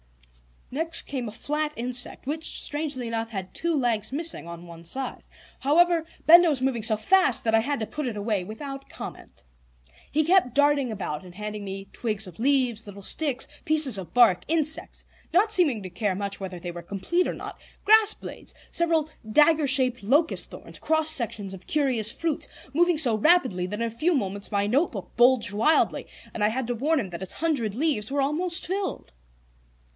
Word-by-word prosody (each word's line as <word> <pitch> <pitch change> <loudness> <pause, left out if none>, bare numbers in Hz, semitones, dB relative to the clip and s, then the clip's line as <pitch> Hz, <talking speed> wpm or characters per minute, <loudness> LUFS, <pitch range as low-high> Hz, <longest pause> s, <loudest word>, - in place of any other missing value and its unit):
Next 330 +3 0
came 255 -4 -4
a - - -5
flat 300 +5 -2
insect, 245 +2 -3
which, 310 +4 -3
strangely 290 -4 -3
enough, 230 0 -3
had 190 -4 -6
two 335 -1 -1
legs 240 -4 0
missing 315 - -2
on 170 0 -9
one 170 -1 -12
side. 260 +9 -5 0.4
However, 335 +3 +3 0.2
Benda 340 +1 +8
was 280 -4 -1
moving 260 -3 0
so 215 0 +4
fast 325 - +3
that 225 - 0
I 225 - +6
had 280 +2 -2
to - - -1
put 300 +4 -5
it 235 - -4
away 205 -2 -1
without 275 +6 -8
comment. - - -9 0.7
He 310 +2 +1
kept 335 -7 +3
darting 285 -2 +3
about 155 -7 -4
and 180 -1 -13
handing 210 0 -5
me 195 0 -7
twigs 215 -3 -2
of 180 0 -11
leaves, 250 -4 +1
little 200 0 -9
sticks, 275 +2 -1 0.2
pieces 305 -8 +5
of 190 -3 -8
bark, 235 -7 +5
insects, 315 0 -1 0.3
not 410 +5 +4
seeming 300 - +2
to 185 - -6
care 190 +2 -1
much 200 0 -4
whether 190 -2 -6
they 175 0 -6
were 175 0 -8
complete 200 - -1
or - - -2
not; - - -7 0.2
grass 435 0 +6
blades, - - -8 0.2
several 330 -2 +1 0.2
dagger 300 +5 +4
shaped 255 -2 +3
locust 290 +11 +2
thorns, - - -10
cross 315 0 +2
sections 210 -8 0
of 190 -1 -11
curious 260 -8 +1
fruits, 325 +1 -2 0.3
moving 345 +2 +3
so 245 -8 +4
rapidly 245 - +3
that 210 +4 -5
in - - +1
a - - -5
few 315 +9 +1
moments 200 -3 -2
my 200 0 +2
notebook 220 - -1
bulged 240 -3 +4
widely, 230 +10 +2 0.3
and 210 - -2
I - - +5
had 250 +3 -2
to 245 - -2
warn 300 +6 +1
him 205 -7 -4
that 170 -1 -7
its 190 - -3
hundred 275 -11 -1
leaves 255 -7 0
were 280 +1 0
almost 335 +5 -1
filled. 380 - -4
255 Hz, 190 wpm, -25 LUFS, 210-310 Hz, 0.7 s, Benda